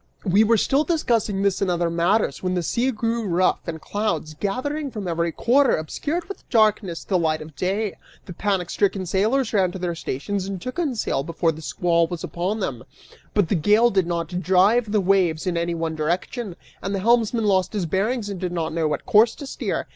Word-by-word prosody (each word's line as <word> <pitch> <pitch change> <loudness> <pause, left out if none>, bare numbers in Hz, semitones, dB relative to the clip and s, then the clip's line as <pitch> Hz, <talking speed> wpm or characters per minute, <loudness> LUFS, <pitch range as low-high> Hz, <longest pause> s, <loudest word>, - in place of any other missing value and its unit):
We 200 +3 +4
were 225 +1 +4
still 275 +7 +2
discussing 230 - 0
this 200 -2 +1
and 195 - +1
other 170 -1 0
matters 175 +6 +1
when 185 0 -1
the 175 - -1
sea 240 +9 0
grew 230 -1 -1
rough, 180 +1 +2
and 160 -1 -4
clouds, 170 -6 -2
gathering 275 - -2
from 210 -6 -6
every 170 0 0
quarter, 255 - +3
obscured 295 - -3
with 395 - -10
darkness 215 -6 +2
the 185 -3 0
light 155 -2 +1
of 155 -1 -11
day. 195 +5 -1 0.3
The 180 - -8
panic 190 -2 -1
stricken 195 -2 0
sailors 220 +8 +1
ran 190 -4 +2
to - - -5
their 175 -2 -2
stations 185 +6 -3
and 195 -2 -4
took 255 - -5
in 295 -7 0
sail 205 - -1
before 165 +2 0
the 160 0 -9
squall 170 +1 +1
was 170 -1 -6
upon 190 +5 -2
them, 125 -10 -3 0.5
but 205 -5 +3
the - - +2
gale 210 +8 +4
did 190 -3 +1
not 175 +1 -2
drive 205 +5 +3
the 210 -1 +2
waves 180 -4 +2
in 180 -2 -1
any 170 0 -1
one 165 -1 -2
direction 175 +6 -2 0.3
and 195 +1 -2
the - - -1
helmsman 230 0 +2
lost 190 -1 +2
his 200 -4 -1
bearings 205 +7 -1
and 200 -3 -5
did 180 -1 -3
not 165 -2 -2
know 165 -1 +1
what 150 - -3
course 230 0 +5
to 285 - -8
steer. 270 - -3
190 Hz, 210 wpm, -23 LUFS, 170-220 Hz, 0.5 s, course